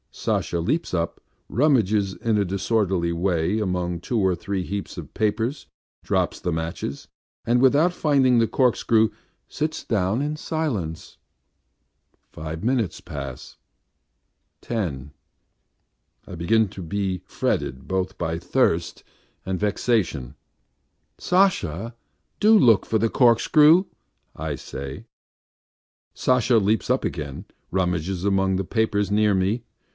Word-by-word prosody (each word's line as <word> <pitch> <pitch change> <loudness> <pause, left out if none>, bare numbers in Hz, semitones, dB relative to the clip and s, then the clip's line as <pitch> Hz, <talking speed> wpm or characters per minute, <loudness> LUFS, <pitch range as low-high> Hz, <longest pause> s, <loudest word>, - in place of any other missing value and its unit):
Sasha 85 - -1
leaps 150 - -1
up, 85 0 -2 0.3
rummages 110 -8 +2
in 115 -2 0
a 105 - +3
disorderly 95 -2 0
way 90 +3 0
among 90 -4 -2
two 115 +6 -2
or 95 -3 +2
three 95 +1 -3
heaps 100 +2 -5
of - - -8
papers, 110 +6 -1 0.4
drops - - 0
the 90 - -2
matches, 80 -3 -4 0.4
and 120 +1 +3
without 145 +7 +4
finding 135 -7 +3
the 115 - +3
corkscrew, 115 -3 +2 0.4
sits 155 +1 -3
down 105 +2 0
in 150 +1 -2
silence.... 120 - -4 1.1
Five 80 +1 -6
minutes 115 -8 0
pass 70 -6 -8 1.0
ten... 75 - -4 1.2
I - - -7
begin 110 +6 +2
to 95 -1 -9
be 95 +1 -2
fretted 65 +1 -2
both 95 0 -2
by 80 -1 -2
thirst - - 0 0.4
and 95 -1 -2
vexation. 105 - 0 0.8
"Sasha, 115 - +1 0.4
do 215 +1 +6
look 115 - +5
for 110 - +1
the 115 - +2
corkscrew," 150 - +5 0.5
I 80 -1 -3
say. 70 +1 -8 1.1
Sasha 125 -1 +3
leaps 110 +2 +1
up 130 +1 +1
again 75 +2 -5
and - - -32 0.2
rummages 90 0 -1
among 95 -1 +2
the 95 - -2
papers 105 -1 0
near 105 0 +3
me. 100 +5 0
100 Hz, 120 wpm, -24 LUFS, 85-120 Hz, 1.2 s, do